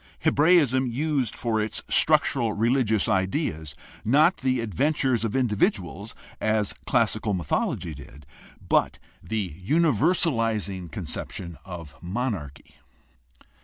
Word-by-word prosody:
Hebraism 145 -5 +4
used 135 -1 -1
for 115 -3 -1
its 110 - -3
structural 115 -3 +3
religious 115 -1 +1
ideas 95 - -1 0.3
not 150 - +4
the 130 -1 0
adven 115 - 0
tures 130 -6 0
of 115 0 -2
individuals, 105 - -1 0.2
as 110 -2 0
classical 105 -3 +1
mythology 85 0 -2
did, 70 0 -13 0.4
but - - +2 0.2
the 105 -7 -3
universalizing 115 - +1
conception 85 +3 -5
of 85 -6 -8
monarchy. 90 - -5
110 Hz, 100 wpm, -25 LUFS, 95-130 Hz, 0.4 s, Hebraism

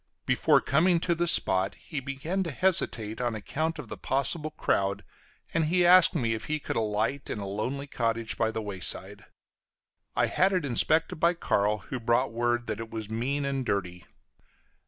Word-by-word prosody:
Before - - +3
coming 170 +5 +3
to 175 - +1
the 170 +1 0
spot, 95 - +3
he 145 - -6
began 140 +8 -3
to 175 - -2
hesitate 125 - 0
on 120 -2 -1
account 155 +10 -2
of - - -7
the - - -8
possible 150 +4 -1
crowd, 100 -9 0 0.5
and 160 -1 +2
he 175 +3 +3
asked 180 0 +7
me 115 -7 +1
if 110 - -5
he 155 - -1
could 150 - -5
alight 110 +5 -1
in - - -3
a 100 - -5
lonely 115 +8 -3
cottage 115 -4 -1
by 115 - +1
the 110 0 -4
wayside; 95 -4 -4 0.9
I - - +3
had 190 +2 +2
it 180 -5 0
inspected 155 +5 +1
by 170 +2 +3
Carl, 105 -9 +1 0.2
who 130 - -2
brought 120 +2 +1
word 120 +1 0
that 105 - -3
it 115 -1 -6
was 110 -1 -6
mean 135 +6 -1
and 135 -1 -1
dirty. 90 -6 -3
125 Hz, 180 wpm, -28 LUFS, 110-155 Hz, 0.9 s, asked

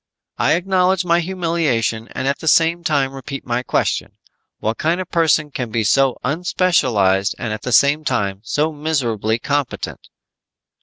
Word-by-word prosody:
"I - - +3
acknowledge 185 +1 +1
my 170 0 +3
humiliation 165 -11 -1
and 130 - -3
at 140 - 0
the 160 - -7
same 165 +3 +3
time 140 -4 0
repeat 135 +1 -7
my 120 0 -1
question: 125 - -1 0.4
What 110 +1 -3
kind 165 +3 +1
of 185 - -6
person 155 -3 +2
can 125 -3 -4
be 110 0 -1
so 135 +4 +2
unspecialized 130 - +1
and 110 -2 -3
at 110 - -6
the 125 - -4
same 140 +6 +4
time 100 -8 -1
so 150 +7 0
miserably 125 -8 -1
competent?" 145 +1 -3
140 Hz, 155 wpm, -19 LUFS, 115-165 Hz, 0.4 s, same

